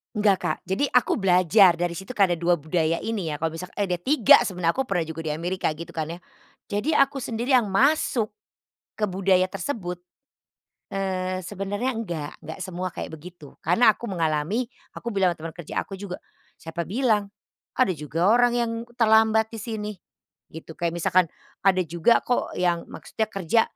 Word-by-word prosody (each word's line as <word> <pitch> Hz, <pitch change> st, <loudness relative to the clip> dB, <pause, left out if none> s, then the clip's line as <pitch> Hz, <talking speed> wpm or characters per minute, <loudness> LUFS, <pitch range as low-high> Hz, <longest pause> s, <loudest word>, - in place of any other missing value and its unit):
Enggak 205 Hz, -2 st, +3 dB
Kak, -, -, -1 dB
jadi 205 Hz, +9 st, 0 dB
aku 245 Hz, -3 st, +2 dB
belajar 185 Hz, 0 st, +5 dB
dari 175 Hz, 0 st, -1 dB
situ 190 Hz, +8 st, -8 dB
karena 190 Hz, -4 st, +4 dB
2 175 Hz, +1 st, +2 dB
budaya 160 Hz, +1 st, 0 dB
ini 210 Hz, -7 st, -3 dB
ya 150 Hz, -, -3 dB
kalau 160 Hz, +1 st, -2 dB
misalka 180 Hz, +2 st, -8 dB
eh, 205 Hz, -, +1 dB
ada 180 Hz, -2 st, -1 dB
3 260 Hz, -1 st, +6 dB
sebenarnya 175 Hz, -3 st, 0 dB
aku 265 Hz, -, 0 dB
pernah 175 Hz, -4 st, 0 dB
juga 160 Hz, 0 st, -6 dB
di 160 Hz, -, -4 dB
Amerika 175 Hz, +5 st, -1 dB
gitu 170 Hz, -, -8 dB
kan 160 Hz, -1 st, -3 dB
ya. 170 Hz, -, -5 dB, 0.5 s
Jadi 280 Hz, +10 st, 0 dB
aku 275 Hz, 0 st, +2 dB
sendiri 240 Hz, +3 st, -2 dB
yang 235 Hz, -5 st, +4 dB
masuk 240 Hz, 0 st, +2 dB, 0.7 s
ke 210 Hz, -, +1 dB
budaya 185 Hz, -1 st, +2 dB
tersebut, 180 Hz, -6 st, -5 dB, 0.9 s
eee, 185 Hz, -1 st, -2 dB
sebenarnya 200 Hz, +6 st, -3 dB
enggak, 175 Hz, -, -4 dB
enggak 160 Hz, -, -9 dB
semua 185 Hz, 0 st, -4 dB
kayak -, -, -5 dB
begitu 160 Hz, -2 st, -13 dB
karena 215 Hz, +6 st, +5 dB
aku 240 Hz, -, -7 dB
mengalami, 170 Hz, +5 st, -1 dB, 0.2 s
aku 235 Hz, -, -5 dB
bilang 190 Hz, -4 st, +2 dB
teman 165 Hz, 0 st, -7 dB
kerja 175 Hz, -, -3 dB
aku 195 Hz, -, -8 dB
juga, 190 Hz, -2 st, -7 dB, 0.4 s
"Siapa 165 Hz, +1 st, -4 dB
bilang? 210 Hz, -, 0 dB, 0.4 s
Ada 255 Hz, -6 st, +2 dB
juga 155 Hz, +5 st, 0 dB
orang 240 Hz, +1 st, +4 dB
yang 235 Hz, -1 st, 0 dB, 0.2 s
terlambat 220 Hz, -1 st, +4 dB
di 225 Hz, -, -8 dB
sini," 215 Hz, -1 st, -4 dB, 0.6 s
gitu, 160 Hz, +1 st, -10 dB
kayak 170 Hz, -1 st, -1 dB
misalkan, 175 Hz, +1 st, +3 dB, 0.4 s
"Ada 185 Hz, -1 st, +4 dB
juga 170 Hz, +7 st, +2 dB
kok 245 Hz, -, -1 dB
yang 175 Hz, -2 st, 0 dB
maksudnya 220 Hz, -, -4 dB
kerja 195 Hz, +1 st, +1 dB
190 Hz, 170 wpm, -25 LUFS, 170-220 Hz, 0.9 s, 3